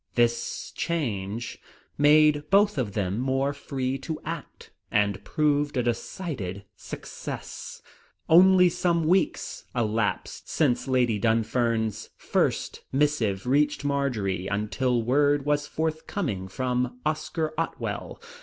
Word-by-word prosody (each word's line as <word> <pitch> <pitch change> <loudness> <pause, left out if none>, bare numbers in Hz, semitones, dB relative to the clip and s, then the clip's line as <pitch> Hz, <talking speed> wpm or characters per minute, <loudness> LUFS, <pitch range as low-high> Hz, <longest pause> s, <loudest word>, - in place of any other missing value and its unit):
This 120 -1 0
change 115 - -2 0.4
made 150 0 +4
both 200 -4 +4
of 110 -6 -2
them 100 +1 -1
more 135 +2 0
free 135 -2 -3
to 155 +4 -5
act, 165 -1 -7 0.2
and 100 -2 +1
proved 145 -2 +1
a 125 - +2
decided 115 - -4
success. - - -7 0.4
Only 180 +2 +7
some 170 -1 +1
weeks 180 +4 0
elapsed 110 -2 -1
since 140 -4 +1
Lady 125 -5 +2
Dunfern's 115 -1 0
first - - -1
missive 130 -9 +1
reached 145 +3 +2
Marjory 115 -10 -1
until 105 +4 0
word 145 +3 +2
was 145 0 +1
forthcoming 155 - -2
from 125 +4 -1
Oscar 155 +1 -1
Otwell. 165 +1 -4
130 Hz, 105 wpm, -26 LUFS, 110-150 Hz, 0.4 s, Only